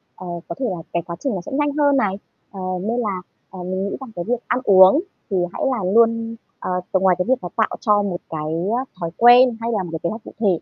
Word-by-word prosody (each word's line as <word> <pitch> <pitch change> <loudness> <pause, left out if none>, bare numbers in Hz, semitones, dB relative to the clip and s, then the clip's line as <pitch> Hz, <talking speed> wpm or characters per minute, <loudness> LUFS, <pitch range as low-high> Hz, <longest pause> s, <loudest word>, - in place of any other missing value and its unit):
ờ, 185 - -9 0.2
có 170 - -5
thể 260 - -1
là 180 - -3 0.2
cái 170 - +1
quá 170 - -5
trình 265 -7 -2
nó 180 - -3
sẽ - - -8
nhanh 290 +1 +1
hơn 285 -2 +4
này. 195 -5 +1 0.4
Ờ, 195 - -9 0.2
nên 230 +4 -1
là, 200 -5 -2 0.3
ờ, 185 -1 -8
mình 185 +1 -2
nghĩ - - -3
rằng 255 -4 -8
cái 175 - -4
việc 245 -1 0
ăn 250 - +1
uống 190 - +7 0.3
thì 195 - 0 0.2
hãy - - -6
là 195 -7 -1
luôn, 230 0 +3 0.2
ờ, - - -5 0.2
ngoài 190 -1 +4
cái 180 - +1
việc 260 -4 +1
là 175 - -4
tạo 220 - +2
cho 210 -2 +3
một 185 -3 -2
cái, 155 0 -3 0.2
á, 260 - -2
thói 165 -1 -3
quen 240 0 +7
hay 230 +1 -1
là 195 -3 0
một 175 - -7
cái 160 - -4
kế 170 - 0
hoạch 220 0 -6
cụ - - -11
thể, 215 - +1
205 Hz, 265 wpm, -21 LUFS, 185-240 Hz, 0.4 s, uống